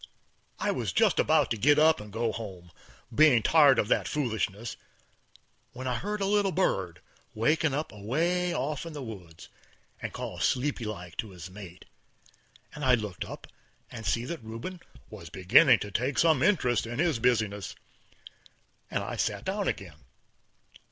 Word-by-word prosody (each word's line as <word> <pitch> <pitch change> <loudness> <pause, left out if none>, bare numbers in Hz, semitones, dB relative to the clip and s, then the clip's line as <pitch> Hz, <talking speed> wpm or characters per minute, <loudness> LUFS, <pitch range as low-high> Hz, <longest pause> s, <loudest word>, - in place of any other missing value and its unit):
I - - 0
was - - -2
just - - +3
about - - +3
to 115 - 0
git 145 +7 +4
up 155 -2 +4
and 105 0 -11
go 115 +2 -1
home, 95 -6 -8 0.4
bein' 125 -4 +5
tired 145 -5 +6
of 105 - +1
that - - +2
foolishness, 115 -5 -2 1.0
when 130 +1 -6
I 125 - 0
heard 210 - -4
a - - +1
little 200 -1 +2
bird 95 - -1 0.3
waking 145 +6 +2
up 150 +2 -3
away 165 - 0
off 150 -2 -2
in 165 - -8
the 145 -2 -6
woods 90 -8 -10 0.5
and - - -4
call 90 - -6
sleepy 125 - 0
like 90 -6 -7
to 110 - -3
his 90 -1 -10
mate, 95 -3 -11 0.9
and 150 - -7
I 130 -2 +5
looked 105 -5 -5
up - - -9 0.5
and 115 -2 -8
see 115 +4 0
that 160 -2 -6
Rubin 115 +12 -7 0.3
was 90 -7 -10
beginning 110 - +5
to 105 - -5
take 125 +8 -1
some 160 -5 +4
interest 125 - +2
in 120 +1 -5
his 160 -5 +1
business, 110 -5 0 1.1
and - - -2
I - - -5
sit - - -1
down - - -1
again. - - -5
120 Hz, 165 wpm, -28 LUFS, 105-150 Hz, 1.1 s, tired